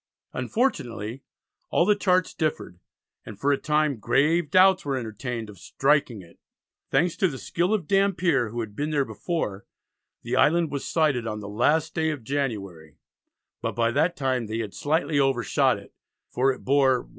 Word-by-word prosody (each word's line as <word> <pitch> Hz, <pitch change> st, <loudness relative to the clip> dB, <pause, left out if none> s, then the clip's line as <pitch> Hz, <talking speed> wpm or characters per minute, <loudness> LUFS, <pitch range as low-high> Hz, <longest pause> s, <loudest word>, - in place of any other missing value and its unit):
Unfortunately 120 Hz, -, -2 dB, 0.5 s
all 170 Hz, -, +3 dB
the 210 Hz, +1 st, +4 dB
charts 185 Hz, -3 st, +1 dB
differed, 150 Hz, -, -3 dB, 0.4 s
and 105 Hz, -2 st, -10 dB
for 145 Hz, -, +2 dB
a 140 Hz, -, +2 dB
time 150 Hz, -3 st, +1 dB
grave 155 Hz, +7 st, +2 dB
doubts 190 Hz, 0 st, +5 dB
were 140 Hz, -2 st, -1 dB
entertained 115 Hz, 0 st, -5 dB
of 100 Hz, -4 st, -13 dB
"striking 135 Hz, -4 st, 0 dB
it." 85 Hz, -, -19 dB, 0.5 s
Thanks 175 Hz, -1 st, +1 dB
to 190 Hz, -, +3 dB
the 140 Hz, -6 st, -5 dB
skill 175 Hz, +8 st, -1 dB
of 200 Hz, -8 st, 0 dB
Dampier, 185 Hz, -, +2 dB
who 120 Hz, +2 st, -4 dB
had 105 Hz, -2 st, -7 dB
been 145 Hz, +5 st, -2 dB
there 145 Hz, -3 st, +1 dB
before, 110 Hz, -, -4 dB, 0.6 s
the -, -, -2 dB
island 165 Hz, 0 st, +3 dB
was 140 Hz, -2 st, -4 dB
sighted 145 Hz, -8 st, +1 dB
on 105 Hz, -1 st, -4 dB
the 105 Hz, -, -8 dB
last 150 Hz, +9 st, +1 dB
day 160 Hz, 0 st, 0 dB
of 145 Hz, -6 st, -4 dB
January, 100 Hz, -, -4 dB, 0.6 s
but -, -, -2 dB
by 115 Hz, 0 st, +1 dB
that 160 Hz, +7 st, +1 dB
time 130 Hz, -4 st, -1 dB
they 110 Hz, +1 st, -3 dB
had 110 Hz, -3 st, -4 dB
slightly 150 Hz, 0 st, 0 dB
overshot 135 Hz, -3 st, +2 dB
it, -, -, -14 dB, 0.4 s
for 135 Hz, +2 st, +2 dB
it 130 Hz, -, -9 dB
bore 135 Hz, -1 st, +4 dB
"W.S. -, -, -22 dB
140 Hz, 175 wpm, -25 LUFS, 115-160 Hz, 0.6 s, doubts